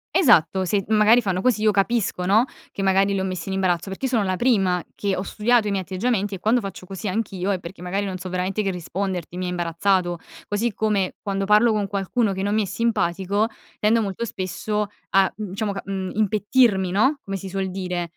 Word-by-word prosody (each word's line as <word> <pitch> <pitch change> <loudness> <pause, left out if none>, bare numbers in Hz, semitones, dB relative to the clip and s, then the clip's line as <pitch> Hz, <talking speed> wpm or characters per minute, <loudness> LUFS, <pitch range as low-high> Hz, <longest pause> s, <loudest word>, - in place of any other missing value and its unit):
Esatto 190 - +4
se 195 +2 0
magari 220 +2 +5
fanno 185 -2 -1
così 230 -3 +1
io 215 - +5
capisco 200 -2 0
no, 220 +6 +5 0.3
che 195 - -4
magari 195 +1 +3
li 195 - 0
ho - - -1
messi 185 0 -4
in 190 - -2
imbarazzo. 185 -1 0
Perché 195 +7 -4
io 265 - -1
sono 230 -4 +2
la 185 -1 0
prima 195 -7 +2
che 200 -2 -1
ho 185 - -3
studiato 220 +2 +2
i 205 - 0
miei 195 -1 0
atteggiamenti, 200 +1 -1
e - - -9
quando 225 +5 +2
faccio 190 -2 -7
così 195 +3 -6
anch'io 195 -2 -2
è 190 -3 0
perché 175 +1 -10
magari 195 +3 -2
non 185 -2 -4
so 185 - -6
veramente 185 +3 -1
che 195 - 0
risponderti, 180 0 -4
mi 185 - -2
hai - - -2
imbarazzato. 175 0 0 0.3
Così 215 +3 0
come 205 -4 0
quando 195 -1 -2
parlo 210 +3 +5
con 210 -2 0
qualcuno 200 +3 0
che 190 0 -3
non 205 +1 0
mi 215 - +2
è - - 0
simpatico 200 -1 0 0.3
tendo 225 +2 +3
molto 200 +3 -4
spesso 210 +1 -2 0.3
a, 195 -1 +4
mhmm, 210 -2 -5
diciamo, 200 +2 -2
mhmm, 190 -1 -4
impettirmi, 210 -2 +2
no. 260 +10 +3
Come 195 0 -3
si 190 +1 -7
suol 190 -1 -2
dire, 180 -2 -3
195 Hz, 220 wpm, -23 LUFS, 185-215 Hz, 0.3 s, magari